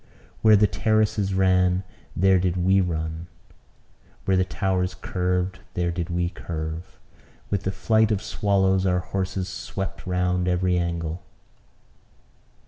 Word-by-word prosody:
Where 110 Hz, -1 st, +7 dB
the 105 Hz, +1 st, +5 dB
terraces 105 Hz, +1 st, +1 dB
ran, 95 Hz, -1 st, +3 dB, 0.3 s
there 95 Hz, +1 st, +4 dB
did 90 Hz, 0 st, 0 dB
we 95 Hz, +2 st, +3 dB
run; 80 Hz, -1 st, -3 dB, 1.0 s
where 95 Hz, -, +3 dB
the 95 Hz, -, +3 dB
towers 95 Hz, 0 st, -1 dB
curved, 90 Hz, 0 st, -1 dB, 0.2 s
there 85 Hz, -1 st, 0 dB
did 85 Hz, 0 st, -3 dB
we 85 Hz, 0 st, 0 dB
curve. 80 Hz, -5 st, -6 dB, 0.5 s
With 100 Hz, -1 st, -1 dB
the 95 Hz, -, +1 dB
flight 110 Hz, +2 st, +2 dB
of 105 Hz, -3 st, 0 dB
swallows 95 Hz, -2 st, +1 dB
our 90 Hz, 0 st, +2 dB
horses 95 Hz, 0 st, -3 dB
swept 95 Hz, +1 st, -6 dB
round 90 Hz, 0 st, 0 dB
every 90 Hz, 0 st, +1 dB
angle. 85 Hz, -1 st, -2 dB
90 Hz, 130 wpm, -24 LUFS, 90-95 Hz, 1.0 s, Where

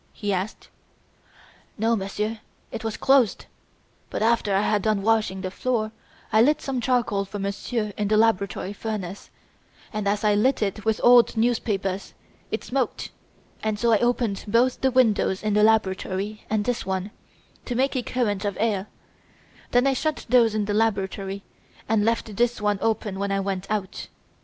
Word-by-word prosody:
he 205 Hz, -1 st, -2 dB
asked. 190 Hz, +4 st, -4 dB, 1.1 s
"No, 225 Hz, +2 st, +2 dB
Monsieur, 210 Hz, +2 st, -3 dB, 0.3 s
it -, -, -6 dB
was 225 Hz, -1 st, -3 dB
closed; 265 Hz, -5 st, +3 dB, 0.6 s
but -, -, -2 dB
after 225 Hz, -3 st, +2 dB
I 195 Hz, -, +3 dB
had 210 Hz, -1 st, +1 dB
done 215 Hz, -1 st, 0 dB
washing 215 Hz, -4 st, +1 dB
the 185 Hz, -1 st, -4 dB
floor, 220 Hz, 0 st, -1 dB, 0.4 s
I 220 Hz, -, +6 dB
lit 295 Hz, +6 st, +4 dB
some 265 Hz, -3 st, -3 dB
charcoal 235 Hz, -6 st, +1 dB
for 195 Hz, +1 st, -7 dB
Monsieur 205 Hz, +2 st, -3 dB
in 210 Hz, -, 0 dB
the 215 Hz, +1 st, +3 dB
laboratory 200 Hz, -3 st, +1 dB
furnace, 200 Hz, -3 st, -5 dB, 0.6 s
and, 210 Hz, -1 st, -2 dB
as 205 Hz, +2 st, 0 dB
I 210 Hz, -1 st, +4 dB
lit 220 Hz, +4 st, +2 dB
it 205 Hz, +1 st, -3 dB
with 220 Hz, -1 st, +1 dB
old 240 Hz, -1 st, +6 dB
newspapers, 200 Hz, -5 st, -1 dB, 0.3 s
it -, -, -3 dB
smoked, 260 Hz, -1 st, -2 dB, 0.6 s
so 235 Hz, +2 st, +1 dB
I 215 Hz, -, +4 dB
opened 240 Hz, -4 st, 0 dB
both 240 Hz, +4 st, +2 dB
the 265 Hz, -, +3 dB
windows 220 Hz, -6 st, +2 dB
in 215 Hz, -1 st, 0 dB
the 210 Hz, -, +3 dB
laboratory 210 Hz, -1 st, +1 dB
and 210 Hz, -1 st, 0 dB
this 245 Hz, -1 st, -1 dB
one, 190 Hz, +1 st, -3 dB, 0.5 s
to 245 Hz, -, -3 dB
make 265 Hz, +3 st, +1 dB
a 255 Hz, -, +1 dB
current 220 Hz, -5 st, -1 dB
of 200 Hz, -3 st, -2 dB
air; 210 Hz, -3 st, 0 dB, 0.8 s
then 245 Hz, +1 st, +3 dB
I 275 Hz, -, +3 dB
shut 310 Hz, +3 st, -2 dB
those 230 Hz, -3 st, +4 dB
in 210 Hz, -1 st, 0 dB
the 205 Hz, -, -2 dB
laboratory 200 Hz, -2 st, -1 dB, 0.4 s
and 220 Hz, -2 st, +2 dB
left 225 Hz, -2 st, -1 dB
this 240 Hz, 0 st, +1 dB
one 205 Hz, -1 st, 0 dB
open 215 Hz, -3 st, -1 dB
when 200 Hz, 0 st, -1 dB
I 195 Hz, -, +1 dB
went 195 Hz, -1 st, -3 dB
out. 205 Hz, -3 st, -3 dB
215 Hz, 170 wpm, -24 LUFS, 200-235 Hz, 1.1 s, I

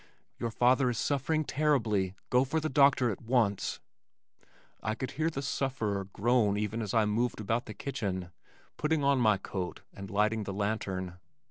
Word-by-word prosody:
"Your 115 Hz, -, -1 dB
father 125 Hz, +3 st, +3 dB
is 120 Hz, -, -2 dB
suffering 145 Hz, +5 st, 0 dB
terribly. 115 Hz, -11 st, +1 dB, 0.2 s
Go 125 Hz, +1 st, +5 dB
for 145 Hz, +4 st, 0 dB
the 155 Hz, 0 st, -2 dB
doctor 140 Hz, -4 st, +4 dB
at 95 Hz, -, -6 dB
once." 115 Hz, -5 st, +1 dB, 1.0 s
I 110 Hz, 0 st, -1 dB
could 130 Hz, -, -4 dB
hear 160 Hz, +3 st, 0 dB
the 140 Hz, -4 st, -4 dB
sufferer 115 Hz, -8 st, -1 dB
groan 105 Hz, +1 st, +2 dB
even 105 Hz, +2 st, -2 dB
as 105 Hz, 0 st, -3 dB
I 110 Hz, -1 st, +4 dB
moved 110 Hz, +3 st, 0 dB
about 115 Hz, +3 st, -1 dB
the 110 Hz, -, -7 dB
kitchen, 95 Hz, -9 st, -3 dB, 0.5 s
putting 155 Hz, -1 st, +1 dB
on 140 Hz, -1 st, +3 dB
my 110 Hz, -4 st, +4 dB
coat 95 Hz, -2 st, -5 dB
and 100 Hz, 0 st, -8 dB
lighting 105 Hz, +2 st, +1 dB
the 95 Hz, -, -4 dB
lantern. 95 Hz, -3 st, -3 dB
115 Hz, 165 wpm, -30 LUFS, 100-135 Hz, 1.0 s, Go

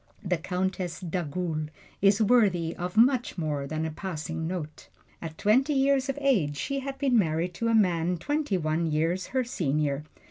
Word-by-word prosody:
The 180 Hz, -4 st, 0 dB
Countess 180 Hz, 0 st, -2 dB
d'Agoult 170 Hz, -2 st, -3 dB, 0.3 s
is 200 Hz, +2 st, +4 dB
worthy 195 Hz, -8 st, +3 dB
of 180 Hz, +3 st, -5 dB
much 245 Hz, 0 st, +3 dB
more 150 Hz, -4 st, -2 dB
than 155 Hz, +2 st, -2 dB
a 160 Hz, -, -3 dB
passing 160 Hz, -2 st, -4 dB
note. 165 Hz, -4 st, -6 dB, 0.3 s
At 160 Hz, -1 st, -7 dB
twenty 260 Hz, +8 st, +3 dB
years 275 Hz, 0 st, +2 dB
of 275 Hz, -, -2 dB
age 200 Hz, -, +1 dB
she 275 Hz, -, -2 dB
had 275 Hz, 0 st, -5 dB
been 270 Hz, -2 st, +1 dB
married 170 Hz, 0 st, 0 dB
to 230 Hz, -, +1 dB
a 230 Hz, -, +3 dB
man 180 Hz, -4 st, +2 dB
twenty 290 Hz, -, -1 dB
one 160 Hz, 0 st, 0 dB
years 165 Hz, +5 st, 0 dB
her 260 Hz, -1 st, 0 dB
senior. 150 Hz, -, -1 dB
180 Hz, 170 wpm, -27 LUFS, 160-230 Hz, 0.3 s, is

